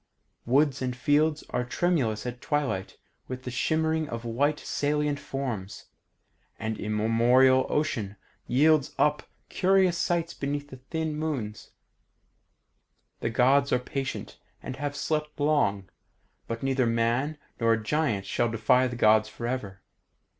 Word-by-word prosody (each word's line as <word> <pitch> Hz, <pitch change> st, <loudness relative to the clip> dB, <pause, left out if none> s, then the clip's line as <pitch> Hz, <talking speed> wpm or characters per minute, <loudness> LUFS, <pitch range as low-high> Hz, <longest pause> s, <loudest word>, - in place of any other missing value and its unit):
Woods 140 Hz, +2 st, +3 dB
and 125 Hz, -1 st, -2 dB
fields 150 Hz, +4 st, +2 dB
are 125 Hz, -, 0 dB
tremulous 125 Hz, -6 st, 0 dB
at 125 Hz, 0 st, -5 dB
twilight 145 Hz, -, -2 dB, 0.3 s
with 130 Hz, 0 st, -6 dB
the 125 Hz, -, -5 dB
shimmering 160 Hz, +4 st, 0 dB
of 115 Hz, 0 st, -5 dB
white 145 Hz, +6 st, +1 dB
saltant 145 Hz, 0 st, -1 dB
forms, 125 Hz, -9 st, -5 dB, 0.7 s
and 110 Hz, -1 st, -4 dB
immemorial 120 Hz, +5 st, +3 dB
Ocean 115 Hz, -9 st, -1 dB, 0.3 s
yields 145 Hz, +3 st, +3 dB
up 150 Hz, 0 st, +1 dB, 0.2 s
curious 190 Hz, -2 st, +2 dB
sights 170 Hz, -1 st, 0 dB
beneath 145 Hz, 0 st, -4 dB, 0.2 s
thin 160 Hz, -2 st, -2 dB
moons. 135 Hz, -9 st, -4 dB, 1.5 s
The -, -, -1 dB
Gods 135 Hz, +4 st, +3 dB
are -, -, +4 dB
patient, 130 Hz, +2 st, -5 dB, 0.2 s
and 130 Hz, -, -5 dB
have 145 Hz, +1 st, -3 dB
slept 150 Hz, 0 st, -2 dB
long, 145 Hz, -11 st, +1 dB, 0.6 s
but 115 Hz, +1 st, -4 dB
neither 135 Hz, -2 st, +1 dB
man 115 Hz, +6 st, 0 dB, 0.2 s
nor 115 Hz, -1 st, +3 dB
giant 110 Hz, -3 st, -1 dB
shall 120 Hz, -, 0 dB
defy 125 Hz, +3 st, +3 dB
the 120 Hz, -, -5 dB
Gods 110 Hz, -2 st, +4 dB
forever. 120 Hz, -6 st, -5 dB
130 Hz, 125 wpm, -27 LUFS, 115-150 Hz, 1.5 s, are